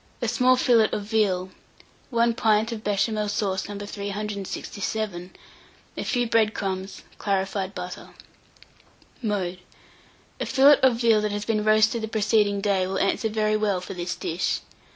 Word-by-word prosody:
A 240 - -2
small 250 +3 +4
fillet 235 -3 +4
of 205 - -2
veal, 200 -4 0 0.6
1 235 -1 +2
pint 220 0 +2
of 220 -2 -6
Béchamel 210 +1 0
sauce 195 -2 -1
No. 205 - -5
367, 200 -1 -4 0.6
a - - -4
few 245 -2 0
bread 220 -2 +2
crumbs, 190 0 -4 0.2
clarified 195 -1 -1
butter. - - -7 1.1
Mode. 190 -5 -2 0.8
A - - -2
fillet 280 +2 +6
of 245 -2 +3
real 225 -2 +5
that 210 0 -1
has 205 0 -3
been 215 -2 0
roasted 215 +1 +3
the 220 - -3
preceding 210 -2 +1
day 195 -2 +1
will 190 +1 -2
answer 195 +3 +1
very 215 0 +1
well 210 -3 +1
for 180 - -7
this 175 -1 -4
dish. 170 +3 -2
210 Hz, 150 wpm, -25 LUFS, 195-220 Hz, 1.1 s, fillet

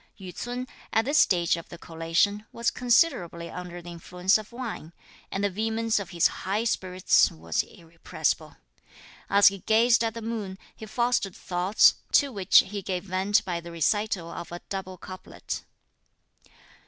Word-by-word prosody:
Yü 185 -2 -8
ts'un, 245 +1 -5 0.2
at 225 0 +2
this 290 +3 +3
stage 175 -3 +3
of 170 - -10
the 175 - -9
collation, 165 +5 0
was 235 0 0
considerably 185 - +1
under 175 -1 -8
the 175 - -9
influence 180 +2 0
of 215 +1 -11
wine, 235 -9 -6 0.4
and 195 - -3
the 205 - +2
vehemence 225 +2 0
of 195 -2 -6
his 170 -3 +1 0.2
high 200 +4 -1
spirits 185 -5 +2
was 80 0 -2
irrepressible. 165 -1 -4 0.7
As 200 0 +7
he 195 0 -8
gazed 230 +4 +3
at 225 0 -2
the 230 - -6
moon, 215 -4 -4 0.2
he 220 - -10
fostered 235 -4 0
thoughts, 180 +3 +3 0.2
to 280 -2 +4
which 195 -4 +5
he 200 +1 -5
gave 185 -1 -3
vent 190 +2 +1
by 175 -3 -2
the 170 0 -10
recital 175 +1 0
of 170 - -8
a 175 - -7
double 190 -1 -5
couplet. 185 +1 -7
190 Hz, 160 wpm, -26 LUFS, 175-220 Hz, 0.7 s, As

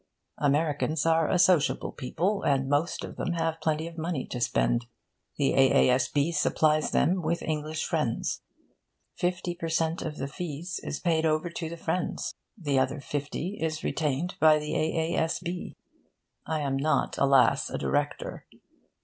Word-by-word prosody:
Americans 150 +1 +1
are 165 -1 +3
a 185 - +3
sociable 180 -4 +3
people, 185 +10 -1
and 135 -1 +1
most 145 +5 0
of - - -7
them 175 - -1
have 165 -1 -1
plenty 155 0 0
of 170 0 -8
money 160 -4 -2
to 125 - -5
spend. 120 0 +1 0.5
The 140 -2 +2
A.A.S.B. 135 +3 +3
supplies 155 0 +2
them 180 +5 +2
with 170 +1 -1
English 155 0 -2
friends. 150 -9 -1 0.7
Fifty 180 0 -1
per 165 -1 -5
cent. 160 +1 0
of 155 -1 -5
the 135 - -3
fees 170 +3 -5
is - - -4
paid 165 -3 +1
over 155 +2 +1
to 165 -1 -4
the 170 - -7
friends. 170 +2 -2 0.2
The 145 -8 +1
other 135 +2 0
fifty 145 +7 -4
is 160 -1 -2
retained 155 +3 -1
by 155 -1 +6
the 150 0 -3
A.A.S.B. 165 +2 -1 0.7
I 155 -1 -1
am 135 -2 0
not, 140 0 0
alas, 135 0 +4
a - - -3
director. 145 0 -2
155 Hz, 150 wpm, -28 LUFS, 145-170 Hz, 0.7 s, by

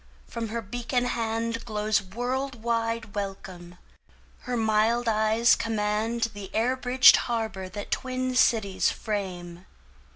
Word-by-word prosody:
From 230 -1 -5
her 230 +1 -4
beacon 245 +4 -2
handGlows 225 -2 -1
world 250 0 -3
wide 230 -2 -1
welcome; 190 -3 -6 0.7
her 250 -1 -2
mild 225 +2 +2
eyes 220 +1 +3
commandThe 220 -1 -2
air 240 +4 +2
bridged 255 0 +6
harbour 220 -5 -3
that 205 +2 -7
twin 255 0 -2
cities 215 -6 +3
frame. 185 -4 -5
225 Hz, 105 wpm, -26 LUFS, 210-240 Hz, 0.7 s, bridged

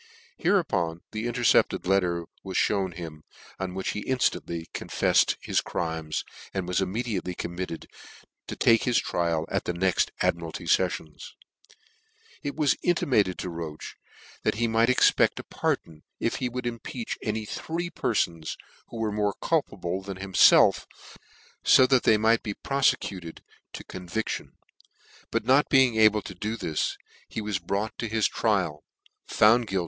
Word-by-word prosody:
Hereupon 85 - +1
the 110 +2 -3
intercepted 120 -5 +2
let 95 +2 +4
ter 85 -2 -2 0.2
was 95 -1 -4
(hewn 95 -3 +1
him, 80 -3 -8 0.4
on 95 -1 -4
which 95 - -2
he 105 - -3
inftantly 85 -10 -1
confef - - -1
fcd - - +4
his - - 0
crimes, 80 -2 -3 0.3
and 95 -2 -2
was 90 +1 +1
immediately 95 -2 -2
committed 85 -1 -5 0.6
to - - -5
take 115 -1 +4
his 125 -2 +2
trial 85 -2 0
at - - -1
the 90 - -1
next 95 0 +2
Admiralty 85 +1 -1
feffions. 80 -3 -1 1.1
It 145 - -4
was 150 -3 +3
imimaccd 120 - +2
to 90 - -4
Roche 80 -2 -7 0.5
that - - 0
he 115 +2 +1
might 115 +1 +3
expect 130 - +4
a - - -6
pardon, 80 -2 -3 0.2
if 115 - -1
he 125 - -2
would 125 0 -5
impeach 120 - -5
any 110 0 -2
three 170 +9 -4
perfons 85 -10 -1 0.3
who 115 - -9
were 110 -1 -1
more 105 -1 0
culpable 90 +2 -1
than 95 -1 -7
himfelf, 95 -1 +5 0.9
ib 130 -1 +6
thac 130 -2 +5
they 110 - +4
might 110 +2 +3
be 105 -3 -4
profecuted 130 -11 -1 0.3
to - - -7
conviction: 95 +4 -5 0.8
but 115 -1 -1
not 135 +4 +4
being 130 -4 +5
able 110 -1 +5
to - - -7
do 110 +5 -4
this, 80 -7 -2 0.3
he - - -4
was 105 -3 -2
brought 100 +3 -2
to 115 - -2
his 110 -1 +2
trial, 75 0 0 0.5
NEW - - +3
NEWGATE 115 +2 +5
CALANDAR. 95 -1 0
100 Hz, 155 wpm, -26 LUFS, 85-115 Hz, 1.1 s, ib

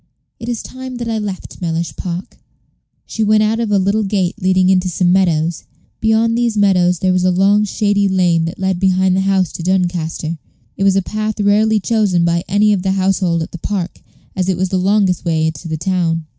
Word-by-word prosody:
It 230 +1 -6
is 235 -2 -3
time 260 0 -8
that 240 -1 -5
I 225 -1 -1
left 200 -3 -7
Mellish 165 -1 -3
Park." 180 0 -6 0.7
She 220 - -3
went 215 0 +3
out 220 +2 0
of 230 -2 -1
a 205 - +2
little 200 +3 +1
gate 195 -1 -1
leading 185 0 +2
into 185 -1 +2
some 175 +1 +1
meadows. 170 -3 +1 0.3
Beyond 225 +1 +2
these 235 -2 0
meadows 180 -3 +3
there 185 +2 +1
was 185 0 +1
a 185 - +3
long 200 +3 +3
shady 205 0 +1
lane 175 -3 +2
that 165 - -5
led 190 -2 -1
behind 185 0 +2
the 190 - +1
house 190 -2 +1
to - - -7
Doncaster. 170 -3 -1 0.4
It - - -2
was 195 -1 +3
a 195 - +1
path 215 +2 -3
rarely 210 +2 +3
chosen 200 -5 +1
by 170 0 0
any 210 +2 +3
of 195 - -1
the 190 0 0
household 185 -3 0
at - - -9
the 175 - -8
Park, 185 -1 -4 0.3
as 185 -1 -1
it 185 - 0
was 185 0 -1
the 185 - 0
longest 190 -1 +1
way 160 -2 0
to 160 +2 -10
the 160 -1 -3
town. 165 -1 -1
190 Hz, 210 wpm, -16 LUFS, 175-210 Hz, 0.7 s, went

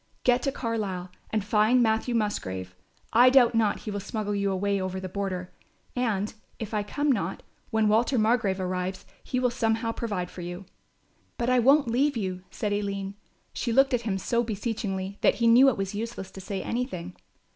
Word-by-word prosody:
Get 250 0 +4
to 275 - 0
Carlisle 205 -8 -3 0.2
and 215 -2 -1
find 215 +4 +4
Matthew 225 +2 +1
Musgrave. 95 - -2 0.4
I 245 +3 +8
doubt 255 -2 +6
not 225 -2 +1
he 215 - -5
will 205 - -3
smuggle 205 +1 -3
you 200 -1 0
away 200 +1 0
over 185 0 -3
the 185 - -5
border; 185 -1 -4 0.4
and, 215 -5 0 0.2
if 220 -1 -6
I 210 - +1
come 285 +8 0
not, 195 -6 -2 0.3
when 220 -1 +2
Walter 230 +5 +3
Margrove 215 -3 +2
arrives 185 0 -3 0.2
he 255 - -1
will 250 -1 +2
somehow 225 -1 0
provide 205 -7 -3
for 180 - -8
you." 175 +2 -6 0.7
"But 240 +1 0
I 255 - +4
won't 275 +3 +5
leave 260 +3 +2
you," 185 -4 -3
said 210 -1 -2
Aline. 200 -1 -2 0.4
She 235 - -2
looked 270 +3 +4
at 245 - +2
him 210 -4 -1
so 235 +4 0
beseechingly, 205 -3 -3
that - - +4
he 235 - 0
knew 245 +4 +7
it 250 - -2
was 195 0 -2
useless 215 -2 -5
to 190 - -9
say 190 0 -4
anything. 185 -8 -3
215 Hz, 190 wpm, -27 LUFS, 190-235 Hz, 0.7 s, I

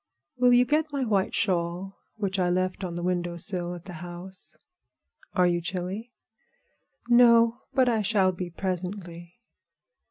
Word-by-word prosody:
Will 250 0 +4
you 245 0 +6
get 305 +4 +1
my 280 -2 -1
white 200 -4 0
shawl 180 +1 -1 0.2
which 200 -3 -2
I 180 -1 +2
left 185 +2 -1
on 175 -2 -4
the 175 - -4
window 175 -1 -1
sill 180 -1 -1
over 175 - -4
at 175 - -11
the 185 - -8
house?" 175 +2 -9 0.8
"Are 180 -3 +3
you 175 -1 +1
chilly?" 185 +5 -4 1.0
"No; 235 -1 +5 0.2
but 260 -2 +4
I 225 -3 +2
shall 200 -2 +2
be 180 -1 -5
presently." 180 -1 -5
185 Hz, 155 wpm, -27 LUFS, 175-220 Hz, 1.0 s, you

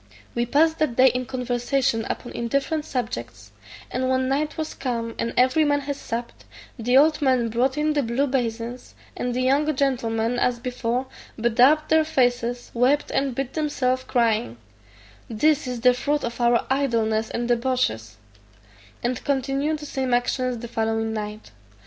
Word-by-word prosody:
We 240 0 -1
passed 320 +5 +3
that 305 -7 0
day 260 +1 +6
in 250 0 -3
conversation 250 -1 -1
upon 240 - -4
indifferent 275 +6 -1
subjects; 120 - -5 0.4
and 255 +1 -1
when 260 0 +1
night 295 +3 -1
was 315 -1 -3
come 230 -3 -3
and 230 - -1
every 260 +5 +4
man 290 -1 +2
had 285 0 -3
supped, 235 -3 -6 0.4
the 245 +3 +3
old 305 +2 +4
man 255 -4 +2
brought 255 +5 0
in 305 0 +1
the 295 - +1
blue 245 +3 0
basins, 240 -2 -3 0.2
and 245 -1 -2
the 255 - 0
young 290 +3 +2
gentlemen 240 -3 0
as 250 -1 +1
before 250 +1 -2 0.3
bedaubed 250 +7 +4
their 315 0 +5
faces, 245 -5 0
wept 260 +5 +2
and 270 -2 0
beat 270 0 -3
themselves, 260 -4 0
crying, 220 - +1 0.7
"This 295 +5 +2
is 250 -2 -4
the 250 +1 +6
fruit 290 +4 -1
of 235 +1 -4
our 235 0 +3
idleness 225 -5 +1
and 235 0 -2
debauches," 240 - 0 0.9
and 240 0 -2
continued 275 +2 0
the 295 - -9
same 260 -3 0
actions 250 0 0
the 235 +1 -7
following 225 -1 -1
night. 210 0 -6
250 Hz, 160 wpm, -24 LUFS, 235-275 Hz, 0.9 s, day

